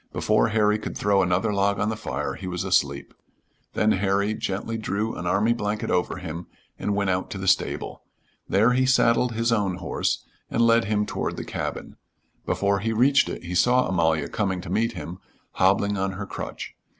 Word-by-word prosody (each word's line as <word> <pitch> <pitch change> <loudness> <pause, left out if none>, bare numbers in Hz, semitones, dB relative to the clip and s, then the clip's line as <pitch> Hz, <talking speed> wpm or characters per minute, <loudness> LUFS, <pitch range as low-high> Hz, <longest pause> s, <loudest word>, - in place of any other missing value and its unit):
Before 110 +1 +2
Harry 110 -1 +2
could - - -6
throw 100 -1 +3
another 95 +4 +1
log 100 0 +1
on 105 - +1
the 110 - -2
fire 105 - -3
he 95 - -7
was 90 -1 -3
asleep. 70 0 0 0.6
Then 110 - +3
Harry 100 +2 +1
gently 110 +2 -3
drew 110 0 -2
an 90 - -5
army 100 +6 +2
blanket 105 -2 -2
over 90 - 0
him 85 +2 -6 0.3
and 105 - -1
went 100 -2 +1
out 90 0 -2
to - - -5
the 95 0 -5
stable. 95 - 0 0.5
There 110 +5 +4
he 130 +1 +2
saddled 125 -1 +3
his 115 +1 0
own 100 -5 +1
horse 90 -2 -2 0.2
and 115 - +2
led 115 -1 +4
him 105 0 0
toward - - -3
the - - -5
cabin. - - -5 0.5
Before 100 0 +1
he 115 +3 -1
reached 135 +5 +4
it - - -6
he 90 +1 -6
saw 125 +7 +3
Amalia 80 -4 +1
coming 95 -4 -1
to 95 - -8
meet 115 +1 +1
him, 90 -1 -7 0.3
hobbling 100 +2 +2
on 95 0 -1
her 100 +2 -5
crutch. - - -7
100 Hz, 190 wpm, -25 LUFS, 95-110 Hz, 0.6 s, There